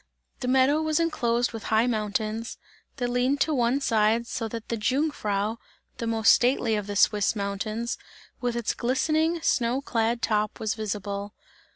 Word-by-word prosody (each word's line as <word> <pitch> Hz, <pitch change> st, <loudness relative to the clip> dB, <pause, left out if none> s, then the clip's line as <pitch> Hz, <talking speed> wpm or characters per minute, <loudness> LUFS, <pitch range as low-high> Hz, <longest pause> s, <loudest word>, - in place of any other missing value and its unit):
The 250 Hz, -, -4 dB
meadow 265 Hz, +4 st, +4 dB
was 315 Hz, 0 st, +1 dB
enclosed 240 Hz, -8 st, +1 dB
with 225 Hz, -1 st, -7 dB
high 220 Hz, +1 st, +3 dB
mountains, 220 Hz, 0 st, -2 dB, 0.4 s
that 245 Hz, -2 st, -2 dB
leaned 250 Hz, +3 st, +1 dB
to 310 Hz, +2 st, +2 dB
one 245 Hz, 0 st, +2 dB
side 225 Hz, -2 st, +2 dB
so 230 Hz, -1 st, -3 dB
that 225 Hz, 0 st, -7 dB
the 230 Hz, -, 0 dB
Jungfrau, 225 Hz, -4 st, -1 dB, 0.4 s
the 230 Hz, -, -2 dB
most 225 Hz, -1 st, +4 dB
stately 245 Hz, -2 st, +3 dB
of 210 Hz, -1 st, -3 dB
the 205 Hz, -, -4 dB
Swiss 210 Hz, +2 st, +3 dB
mountains, 215 Hz, +3 st, -3 dB, 0.4 s
with 245 Hz, -1 st, -1 dB
its 235 Hz, -2 st, -1 dB
glistening 315 Hz, +6 st, 0 dB
snow 245 Hz, -2 st, +1 dB
clad 235 Hz, -3 st, -1 dB
top, 215 Hz, -1 st, 0 dB
was 220 Hz, -1 st, -1 dB
visible. 205 Hz, -1 st, -4 dB
230 Hz, 160 wpm, -26 LUFS, 215-255 Hz, 0.4 s, meadow